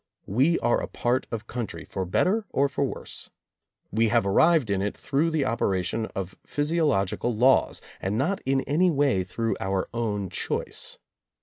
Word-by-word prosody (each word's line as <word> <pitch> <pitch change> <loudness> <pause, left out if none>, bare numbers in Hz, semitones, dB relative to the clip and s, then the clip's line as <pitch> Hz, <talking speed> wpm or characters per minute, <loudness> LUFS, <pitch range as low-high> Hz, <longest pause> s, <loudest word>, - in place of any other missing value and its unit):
We 135 - +3
are 120 - +2
a - - -3
part 120 +2 -1
of 115 -2 -5
country, 120 -2 -5
for 95 -1 -4
better 195 - +1
or 140 +1 +2
for 140 - -1
worse. 135 - -5 0.6
We 115 +1 +3
have 115 -1 +2
ar 100 - +1
rived 160 -8 +4
in 95 -1 +1
it 100 +1 -2
through 150 +4 +1
the 155 -4 0
operation 105 0 0
of 95 -1 -4
physiological 145 - 0
laws, 130 +4 +3 0.2
and 100 +3 -1
not 170 +11 0
in 135 0 +1
any 165 +8 +2
way 140 - +2
through 115 +5 -2
our 95 -1 -1
own 105 -5 -2
choice. - - -3
120 Hz, 170 wpm, -26 LUFS, 100-145 Hz, 0.6 s, rived